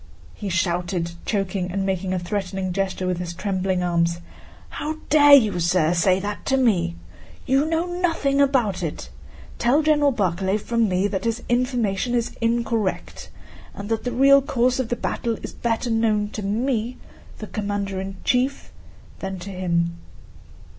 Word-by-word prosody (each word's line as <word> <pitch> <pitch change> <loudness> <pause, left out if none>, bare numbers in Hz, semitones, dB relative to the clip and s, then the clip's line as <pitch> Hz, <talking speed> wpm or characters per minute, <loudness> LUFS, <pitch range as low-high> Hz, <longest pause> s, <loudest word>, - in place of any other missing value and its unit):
he 205 - -5
shouted, 175 -1 -1 0.2
choking 195 -3 -1
and 195 +1 -1
making 190 -1 -1
a 185 - 0
threatening 185 0 -3
gesture 190 -1 -2
with 180 -1 -1
his 175 -1 -5
trembling 185 -1 -1
arms: 170 -1 +1 0.5
"How 310 +1 -4 0.2
dare 290 -1 +8
you, 215 -9 +3
sir, 170 -1 +2
say 185 +2 +3
that 205 +1 -5
to 270 - +3
me? 180 -10 +2 0.5
You 270 +2 +2
know 325 +1 0
nothing 330 -6 0
about 245 -10 +2
it. 160 -4 -5 0.5
Tell 265 +6 +3
General 295 -2 +4
Barclay 190 -3 0
from 230 0 0
me 185 +1 +1
that 200 +1 -3
his 230 +1 -1
information 245 -2 0
is 235 -1 -1
incorrect 230 -3 -1 0.5
and 200 +1 -7
that 225 -1 -1
the 245 - -2
real 275 +2 +6
course 255 -2 +1
of 250 -3 -1
the 240 - 0
battle 230 -1 -2
is - - -6
better 235 +1 -1
known 215 -2 +1
to 215 - -6
me, 230 +3 -1 0.4
the 215 - -6
commander 200 -2 -3
in 190 0 -6
chief, 255 +2 0 0.5
than 190 0 -4
to 185 +2 -8
him." 170 -2 -1
205 Hz, 160 wpm, -23 LUFS, 185-245 Hz, 0.5 s, dare